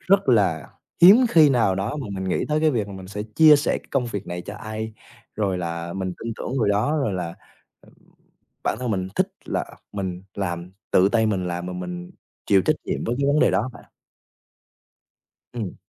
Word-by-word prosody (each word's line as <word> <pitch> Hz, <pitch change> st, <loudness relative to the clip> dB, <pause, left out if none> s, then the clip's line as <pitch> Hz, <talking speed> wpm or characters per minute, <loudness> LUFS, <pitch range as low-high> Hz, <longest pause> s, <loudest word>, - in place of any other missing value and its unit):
rất 195 Hz, -5 st, +2 dB
là 95 Hz, -, +2 dB, 0.3 s
hiếm 190 Hz, +5 st, +11 dB
khi 155 Hz, -3 st, +7 dB
nào 115 Hz, -7 st, +3 dB
đó 100 Hz, +9 st, -2 dB
mà 140 Hz, -6 st, -5 dB
mình 95 Hz, -1 st, -4 dB
nghĩ -, -, 0 dB
tới 150 Hz, +1 st, +1 dB
cái 155 Hz, -, +4 dB
việc 110 Hz, -7 st, -1 dB
là 100 Hz, -, -8 dB
mình 95 Hz, -1 st, -9 dB
sẽ 105 Hz, +1 st, -4 dB
chia 150 Hz, +8 st, +6 dB
sẻ 145 Hz, -, 0 dB
cái -, -, -22 dB
công 130 Hz, -3 st, 0 dB
việc 100 Hz, -4 st, -5 dB
này 90 Hz, 0 st, -5 dB
cho 100 Hz, -, -8 dB
ai, 110 Hz, +1 st, -6 dB, 0.4 s
rồi 100 Hz, -4 st, 0 dB
là 85 Hz, 0 st, -4 dB
mình 95 Hz, -1 st, -3 dB
tin 115 Hz, -, -4 dB
tưởng 135 Hz, -, -3 dB
rồi 110 Hz, -4 st, +2 dB
đó, 105 Hz, +10 st, +1 dB
rồi 135 Hz, -8 st, 0 dB
là, 85 Hz, -2 st, -4 dB, 0.5 s
ừm, -, -, -21 dB, 0.7 s
bản -, -, 0 dB
thân 125 Hz, -3 st, -2 dB
mình 95 Hz, -2 st, -1 dB
thích -, -, +2 dB, 0.2 s
là -, -, -2 dB, 0.3 s
mình 95 Hz, -2 st, -4 dB
làm, 90 Hz, -2 st, -4 dB, 0.2 s
tự 95 Hz, +2 st, +5 dB
tay 110 Hz, -1 st, +2 dB
mình 95 Hz, -4 st, 0 dB
làm 90 Hz, 0 st, -3 dB
mà 90 Hz, -, -5 dB
mình 90 Hz, -1 st, -6 dB, 0.3 s
chịu 95 Hz, -2 st, +4 dB
trách 155 Hz, -, +2 dB
nhiệm -, -, -2 dB
với 120 Hz, -, -1 dB
cái 140 Hz, -, +2 dB
vấn 145 Hz, +2 st, +3 dB
đề -, -, +4 dB
đó 120 Hz, +5 st, 0 dB
bạn. -, -, -14 dB, 1.7 s
Ừm. 110 Hz, -6 st, -4 dB
100 Hz, 210 wpm, -23 LUFS, 90-125 Hz, 1.7 s, hiếm